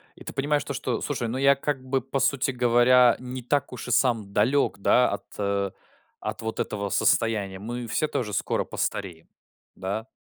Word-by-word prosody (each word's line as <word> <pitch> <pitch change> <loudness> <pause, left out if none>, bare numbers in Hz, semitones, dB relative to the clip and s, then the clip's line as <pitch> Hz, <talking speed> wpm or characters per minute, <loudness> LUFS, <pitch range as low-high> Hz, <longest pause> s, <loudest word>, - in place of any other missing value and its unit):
И - - -13
ты - - -7
понимаешь 145 +2 0
то, - - -5
что, - - -2
слушай, 120 - -2
ну 115 +3 -3
я 140 +1 +5
как 140 -1 -3
бы, 130 0 0
по 135 +2 -3
сути 135 +1 +1
говоря, 125 0 +5
не 125 0 -6
так 140 +4 0
уж 125 - -7
и - - -3
сам 115 -5 +1
далек, 125 +8 +2
да, 125 +5 +4
от, 100 - -4
э, 100 -1 -1 0.5
от - - -5
вот 110 0 -4
этого 100 -1 -2
состояния. 100 -2 +1
Мы 120 +3 -5
все 155 - 0
тоже 110 -8 -3
скоро - - 0
постареем. 90 -5 -4 0.5
Да? 100 +5 -4
120 Hz, 190 wpm, -26 LUFS, 105-130 Hz, 0.5 s, я